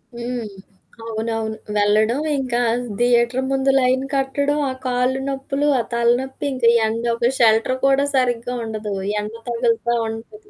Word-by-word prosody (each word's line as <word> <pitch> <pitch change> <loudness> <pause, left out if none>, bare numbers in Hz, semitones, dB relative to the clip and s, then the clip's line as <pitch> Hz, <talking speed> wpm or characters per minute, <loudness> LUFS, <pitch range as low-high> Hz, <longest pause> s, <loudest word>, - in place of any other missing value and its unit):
హ్మ్. 240 -1 -4 0.6
అవునవును. 225 -1 -3 0.2
వెళ్లడం, 215 +4 +2 0.2
ఇంకా 250 -3 -1 0.4
థియేటర్ 245 +1 +2
ముందు 270 0 +2
లైన్ 255 +1 +2
కట్టడం, 280 +2 0
ఆ - - -4
కాళ్ళు 250 +1 +1
నొప్పులు, 275 +2 -2
ఆ - - +2
తలనొప్పి, 245 +4 0
ఇంక 255 -2 -2 0.2
ఎండ. 225 +1 -2
ఒక 240 +2 +1
షెల్టర్ 225 +2 +3
కూడా 275 +1 +3
సరిగ్గా 245 -1 0
ఉండదు. 215 -2 -4 0.3
ఎండ 210 +1 -5 0.2
తగులుతూ 235 0 0
ఉంటది. 415 - -10
245 Hz, 130 wpm, -21 LUFS, 225-265 Hz, 0.6 s, షెల్టర్